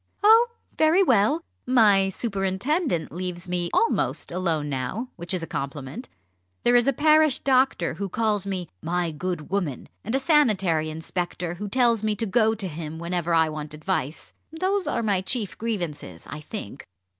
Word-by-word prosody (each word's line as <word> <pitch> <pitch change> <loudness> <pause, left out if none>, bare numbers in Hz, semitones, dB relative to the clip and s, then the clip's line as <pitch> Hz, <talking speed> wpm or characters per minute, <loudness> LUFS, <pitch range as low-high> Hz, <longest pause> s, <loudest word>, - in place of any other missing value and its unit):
"Oh, 450 +3 +7 0.3
very 320 +5 +4
well! 255 - +3 0.2
my 205 -6 +5
superintendent 195 - -1
leaves 180 +1 -5
me 175 -1 -1
almost 460 - +1
alone 170 -4 -1
now, 145 - -3
which 170 0 -7
is 185 -3 -1
a - - -2
compliment. 140 - -6 0.5
There 240 - +4
is 240 +1 +4
a - - +5
parish 305 +1 +4
doctor 260 -11 +2
who 195 +4 -4
calls 210 -1 0
me 185 -3 -3
'my 175 0 -1
good 175 0 -4
woman,' 175 -10 -2
and 225 +5 -2
a - - +2
sanitary 205 - +2
inspector 175 +2 -4
who 205 +4 -6
tells 235 -2 +3
me 215 -1 0
to 225 - -2
go 220 +1 +2
to 200 -3 -3
him 160 -1 -6
whenever 170 0 -2
I 160 -1 +4
want 150 0 -6
advice. 155 -2 -3 0.2
Those 370 +2 -1
are 235 - -1
my 200 -4 +1
chief 210 +1 -2
grievances, 170 - -4
I 150 - -7
think." 150 - -8
195 Hz, 165 wpm, -25 LUFS, 170-240 Hz, 0.5 s, Oh